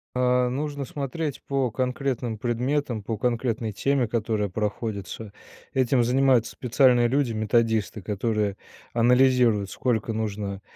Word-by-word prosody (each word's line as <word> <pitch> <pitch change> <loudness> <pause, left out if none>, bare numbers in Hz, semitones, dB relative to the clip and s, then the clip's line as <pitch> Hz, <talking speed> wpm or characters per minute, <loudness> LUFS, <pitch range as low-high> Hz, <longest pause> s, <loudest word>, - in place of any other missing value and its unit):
А, 125 0 +2
нужно 145 +1 -3
смотреть 145 +2 -4
по 135 -3 0
конкретным 125 -2 -2
предметам, 120 0 -1
по 110 0 -3
конкретной 115 -1 -1
теме, 135 +3 +1
которая 110 -3 -1
проходится. 105 0 -4 0.4
Этим 130 -1 +2
занимаются 125 -1 +3
специальные 125 -1 +3
люди- 130 -1 +1
методисты, 110 -1 +1
которые 105 0 -1 0.4
анализируют, 120 -3 +4
сколько 115 -1 -1
нужно, 105 -2 -3
120 Hz, 110 wpm, -25 LUFS, 110-130 Hz, 0.4 s, анализируют